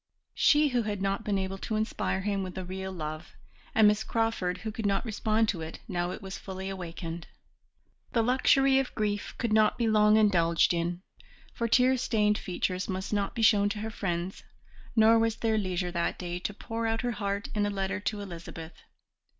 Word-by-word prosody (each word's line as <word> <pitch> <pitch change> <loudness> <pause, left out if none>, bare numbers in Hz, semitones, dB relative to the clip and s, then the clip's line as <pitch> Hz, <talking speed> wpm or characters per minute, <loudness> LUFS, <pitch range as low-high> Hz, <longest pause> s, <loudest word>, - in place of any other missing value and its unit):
She 295 0 +4
who 250 -2 +1
had 210 -2 -3
not 195 +3 -1
been 205 -2 0
able 190 0 -3
to 220 - -3
inspire 215 -3 -1
him 200 0 -1
with 185 -1 -6
a 185 - -4
real 190 +1 -5
love, 155 -2 -6 0.4
and 220 -1 +7
Miss 210 +1 +3
Crawford 225 -5 -1
who 220 - -2
could 215 -1 -2
not 195 +3 0
respond 220 0 +1
to 175 -5 -2
it 160 0 -6
now 175 -4 -1
it 190 - -7
was 190 0 -6
fully 190 0 -6
awakened. 170 -2 -6 0.9
The 230 - +3
luxury 265 +2 +4
of 270 - -3
grief 205 -2 -2
could 235 -3 -1
not 215 -1 +4
be 235 - +1
long 215 0 +5
indulged 170 -6 +3
in, 175 +1 -2 0.5
for 235 - -1
tear 255 +3 +4
stained 210 -4 +1
features 185 0 -2
must 190 +2 -3
not 200 -1 -1
be 230 - -1
shown 205 -1 +5
to 210 +1 -4
her 220 +1 -4
friends, 180 -3 -3 0.5
nor 225 0 +6
was 225 -1 +1
there 220 -2 +1
leisure 180 -2 -2
that 170 -1 -1
day 175 -1 -4
to 180 - -3
pour 225 +2 -4
out 225 0 0
her 245 -1 -1
heart 200 -2 -3
in 205 -1 +1
a - - -1
letter 195 0 -2
to 205 0 -3
Elizabeth. 170 -3 -8
205 Hz, 200 wpm, -29 LUFS, 185-220 Hz, 0.9 s, and